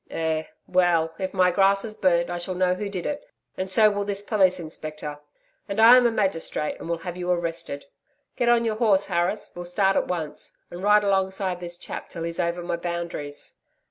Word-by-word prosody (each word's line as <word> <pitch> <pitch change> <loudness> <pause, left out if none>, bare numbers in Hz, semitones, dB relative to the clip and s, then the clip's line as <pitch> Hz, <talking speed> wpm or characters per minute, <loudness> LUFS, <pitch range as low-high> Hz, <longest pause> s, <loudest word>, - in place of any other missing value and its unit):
'Eh? 160 -1 -1 0.2
Well, 175 -3 +2
if 190 -1 -2
my 185 -1 +3
grass 195 +2 +3
is 215 - -5
burned, 175 -4 +2
I 175 - -3
shall 180 +1 -3
know 180 0 +2
who 200 +2 -4
did 185 -3 -4
it, 290 0 -3 0.3
and 190 0 -3
so 215 +2 +5
will 205 0 -1
this 200 0 -2
Police 190 -4 +3
Inspector. 155 -2 -6 0.5
And 200 +2 -2
I 230 +3 +9
am 250 -1 +6
a - - +1
magistrate, 190 -7 -1
and - - -7
will 170 - 0
have 175 +1 -6
you 180 0 -3
arrested. 170 -4 -2 0.5
Get 240 - +1
on 235 -1 +4
your 220 -1 -1
horse, 205 -4 +4
Harris, 180 +3 -1
we'll 175 0 -6
start 190 +2 +2
at - - +1
once, 165 -4 -4
and 175 - -7
ride 210 +1 +5
alongside 190 -2 0
this 175 -1 -7
chap - - -7
till 165 - -6
he's 170 0 -4
over 175 0 -1
my 175 0 -2
boundaries.' 170 -4 -4
180 Hz, 205 wpm, -25 LUFS, 170-200 Hz, 0.5 s, I